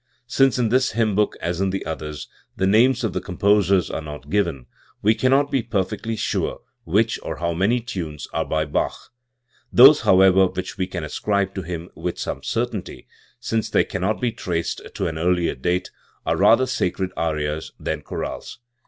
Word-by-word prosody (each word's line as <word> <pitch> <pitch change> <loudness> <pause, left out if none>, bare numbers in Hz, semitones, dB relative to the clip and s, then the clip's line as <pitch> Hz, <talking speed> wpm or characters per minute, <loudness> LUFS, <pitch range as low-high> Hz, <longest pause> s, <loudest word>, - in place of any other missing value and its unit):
Since 135 +2 +3
in 120 -3 +1
this 130 +1 +2
hymn 110 -2 +1
book, 105 +1 +1
as 85 +2 -2
in 95 - +1
the 95 +1 -3
others, 75 -2 -5 0.3
the 95 - +1
names 120 +6 +4
of 110 - -1
the - - -2
com 90 -3 -8
posers 100 -2 +3
are - - -3
not 75 -1 -9
given, 85 -11 0 0.4
we 110 +2 +5
cannot 135 +4 +2
be 135 - +2
perfectly 110 0 -2
sure - - -2 0.2
which 110 +6 +1
or - - -5
how 85 0 -2
many 100 +8 +1
tunes 85 - -6
are - - 0
by 80 0 -1
Bach. 75 - -3 0.6
Those, 135 +5 +8
however, 95 0 +5
which 90 0 -5
we 95 -2 -2
can 90 -3 -5
ascribe 100 +5 -1
to 95 - -4
him. 85 0 -6
with - - -4
some - - -4
certainty, - - -3 0.3
since 115 -1 -2
they - - +3
cannot 100 +5 -2
be 125 -2 0
traced 85 -7 -3
to - - -2
an 80 -1 -3
earlier 90 0 +1
date, 90 +8 -2 0.3
are - - +1
rather 130 - +5
sacred 95 -6 -1
arias 75 -1 -2
than - - -3
chorales. - - -6
95 Hz, 180 wpm, -22 LUFS, 85-115 Hz, 0.6 s, Those